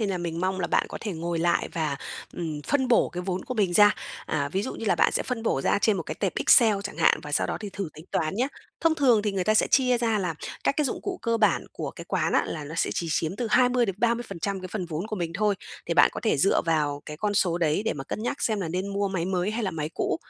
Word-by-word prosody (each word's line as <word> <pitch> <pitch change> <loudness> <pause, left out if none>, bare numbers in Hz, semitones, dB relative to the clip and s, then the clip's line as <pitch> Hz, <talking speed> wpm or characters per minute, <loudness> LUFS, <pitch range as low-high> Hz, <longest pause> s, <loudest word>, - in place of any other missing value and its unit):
nên 215 - 0
là 185 - -2
mình 170 -1 -3
mong 190 +1 -1
là 175 - 0
bạn - - +2
có - - -6
thể 210 -4 -3
ngồi 170 +1 -3
lại 170 +1 +1
và, 155 -4 -1 0.4
ừm, 155 -4 -4
phân 265 -3 +1
bổ 240 - +4
cái 175 - -5
vốn 185 0 -3
của 255 - -4
mình 200 -6 +1
ra. 205 +3 +6 0.3
À, 140 -2 -1
ví 190 +7 -1
dụ 260 - -4
như - - -6
là 210 - +3
bạn - - +3
sẽ - - 0
phân 245 -3 -3
bổ 225 - +1
ra - - +2
trên 210 0 +2
một 175 - -2
cái - - -5
tệp - - -1
Excel 225 -5 +6
chẳng 200 - -6
hạn 165 - +4
và 150 - -8
sau - - +2
đó - - -2
thì 210 -2 -6
thử 195 -3 -4
tính 155 - -12
toán 155 +3 0
nhá. 250 +6 0 0.3
Thông 330 -1 +3
thường 250 -8 +4
thì 210 -1 -1
người 190 -2 -1
ta 215 - +3
sẽ 215 - +4
chia 250 -2 +3
ra 225 -2 +1
là 180 -4 -2 0.3
các - - +2
cái 300 - +2
dụng 260 - -2
cụ 375 -2 -4
cơ 230 -1 +1
bản 220 -2 +2
của - - -4
cái - - -10
quán - - 0
á - - +4
là 155 -2 -5
nó 150 +3 -7
sẽ - - 0
chỉ 170 - -2
chiếm 165 +3 -1
từ 240 - -2
20-30% 235 -4 +1
cái 185 - -7
phần 185 -1 -4
vốn 165 +3 -4
của 215 - -4
mình 170 -3 -3
thôi, 205 +2 +2 0.3
thì - - -1
bạn - - +7
có - - -5
thể 220 - +2
dựa 145 +8 +3
vào 150 -3 0
cái 150 - -6
con 205 +5 -1
số 175 -3 +2
đấy 160 +2 +1
để - - +1
mà 135 - -6
cân 215 - -5
nhắc 245 +4 -3
xem 215 -3 +1
là 175 - -2
nên 185 +4 -2
mua 200 0 -1
máy 185 -3 -2
mới 185 +1 0
hay 225 +2 -2
là 195 - 0
máy 155 -3 -3
cũ. - - 0
195 Hz, 295 wpm, -26 LUFS, 165-220 Hz, 0.4 s, bạn